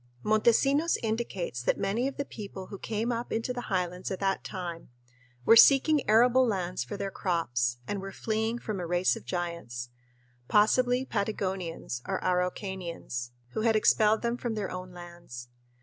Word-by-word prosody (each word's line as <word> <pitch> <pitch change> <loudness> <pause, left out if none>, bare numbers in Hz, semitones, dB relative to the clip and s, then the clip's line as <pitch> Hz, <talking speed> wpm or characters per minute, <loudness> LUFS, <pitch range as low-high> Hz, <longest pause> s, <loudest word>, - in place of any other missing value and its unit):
Montesinos 270 +9 +3
indicates 215 - -2
that - - +1
many 220 +6 0
of 275 - -6
the 280 - -2
people 200 -5 -8
who 200 - -7
came 225 +2 -2
up 235 +1 -3
into 225 +3 -1
the 245 -1 -6
highlands 180 -2 -1
at 190 - -4
that 195 -1 0
time 175 -3 -6 0.6
were 225 - +7
seeking 275 +3 +6
arable 245 +4 +6
lands 185 -6 -1
for 205 - -6
their 200 -1 -3
crops 125 -11 -1
and 200 -2 -3
were 195 0 -6
"fleeing 220 +3 -1
from 215 -4 -4
a 175 - -4
race 175 +2 +2
of - - -10
giants" 170 -9 -4 0.6
possibly 245 +4 +3
Patagonians 190 - -3
or 195 - -1
Araucanians 180 - -2 0.2
who 215 - -3
had 225 0 +3
expelled 215 +1 +4
them 235 +1 0
from 240 -2 -3
their 210 -2 -3
own 185 0 -6
lands. 170 -9 -10
195 Hz, 165 wpm, -29 LUFS, 175-230 Hz, 0.6 s, were